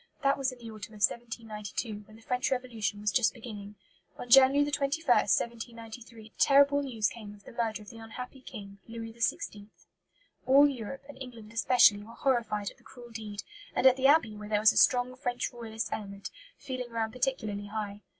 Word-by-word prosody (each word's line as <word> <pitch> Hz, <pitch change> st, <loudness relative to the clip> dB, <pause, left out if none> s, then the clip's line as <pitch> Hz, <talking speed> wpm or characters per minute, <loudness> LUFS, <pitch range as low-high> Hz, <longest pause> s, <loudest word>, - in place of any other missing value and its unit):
That 275 Hz, 0 st, +4 dB
was 270 Hz, -1 st, -1 dB
in 255 Hz, -, -11 dB
the 230 Hz, -2 st, -9 dB
autumn 215 Hz, 0 st, -9 dB
of 205 Hz, -, -4 dB
1792, 220 Hz, -2 st, -5 dB
when 215 Hz, -, -15 dB
the 225 Hz, -, -17 dB
French 250 Hz, +2 st, 0 dB
Revolution 235 Hz, -6 st, -2 dB
was 210 Hz, -1 st, +1 dB
just 245 Hz, +3 st, +2 dB
beginning. 210 Hz, -3 st, -9 dB, 0.4 s
On -, -, -7 dB
January 270 Hz, +2 st, +7 dB
21, 290 Hz, +3 st, -1 dB
1793, 230 Hz, -2 st, -1 dB
the -, -, -41 dB
terrible 285 Hz, 0 st, +5 dB
news 230 Hz, -6 st, 0 dB
came 210 Hz, -3 st, -8 dB
of 200 Hz, -, -20 dB
the -, -, -12 dB
murder 225 Hz, -3 st, -2 dB
of 205 Hz, -, -12 dB
the 230 Hz, -, -12 dB
unhappy 250 Hz, +4 st, -8 dB
King, 200 Hz, -5 st, -10 dB
Louis 225 Hz, -1 st, -7 dB
XVI. 210 Hz, -2 st, -2 dB, 0.8 s
All 280 Hz, +2 st, +7 dB
Europe, 265 Hz, -1 st, -5 dB
and 275 Hz, -2 st, -12 dB
England 230 Hz, -4 st, -10 dB
especially, 225 Hz, -3 st, +5 dB
were 225 Hz, +3 st, -12 dB
horrified 225 Hz, -6 st, 0 dB
at -, -, -21 dB
the -, -, -25 dB
cruel 240 Hz, -2 st, -13 dB
deed; 215 Hz, -2 st, -6 dB, 0.3 s
and -, -, +1 dB
at 260 Hz, -1 st, +8 dB
the 265 Hz, 0 st, +3 dB
Abbey, 280 Hz, -8 st, +4 dB
where 210 Hz, 0 st, -8 dB
there 210 Hz, -1 st, +2 dB
was 215 Hz, +1 st, +6 dB
a -, -, -12 dB
strong 250 Hz, 0 st, +4 dB
French 250 Hz, -2 st, -3 dB
Royalist 225 Hz, -2 st, -5 dB
element, 200 Hz, -2 st, -6 dB, 0.3 s
feeling 255 Hz, -3 st, -5 dB
ran 225 Hz, -1 st, -2 dB
particularly 220 Hz, -5 st, -2 dB
high. 205 Hz, -1 st, -5 dB
230 Hz, 190 wpm, -30 LUFS, 215-255 Hz, 0.8 s, at